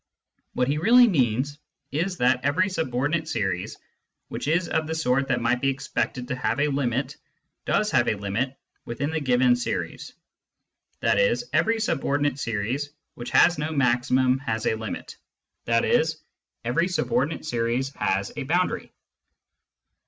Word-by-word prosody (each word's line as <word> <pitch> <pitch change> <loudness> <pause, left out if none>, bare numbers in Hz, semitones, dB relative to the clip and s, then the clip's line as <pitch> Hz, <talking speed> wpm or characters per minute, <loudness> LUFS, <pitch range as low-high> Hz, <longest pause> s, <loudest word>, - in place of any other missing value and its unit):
What 125 - +1
he 145 +2 0
really 240 +7 +6
means 140 - 0 0.3
is 175 +5 -1
that 125 -1 +2
every 160 +9 +2
subordinate 155 0 -1
series 95 - -2 0.5
which - - -5
is 170 +3 +1
of 160 -1 -1
the 160 - -2
sort 135 -3 +1
that 135 - 0
might 120 +1 +1
be 135 - +2
ex 135 0 -5
pected 125 -1 -2
to 130 - -1
have 120 0 -1
a 150 +1 +2
limit 135 -1 -1 0.5
does - - +1
have - - +3
a - - +2
limit 105 +7 -3 0.3
within 140 +6 -3
the 160 - -1
given 125 -3 +3
series; 120 - -4 0.9
i.e. - - +3 0.2
every 225 0 +2
subordinate 145 - 0
series 120 +5 -2 0.2
which 120 - -7
has 175 -4 +4
no 150 +1 -2
maximum 130 -1 +2
has 110 -4 -3
a - - +2
limit, 110 -1 -6 0.5
i.e. 115 - +3 0.6
every 165 +9 +1
subordinate 145 -3 -1
series 120 0 -1
has 100 -4 -1
a - - -4
boundary. 175 +7 -1
135 Hz, 145 wpm, -25 LUFS, 120-155 Hz, 0.9 s, really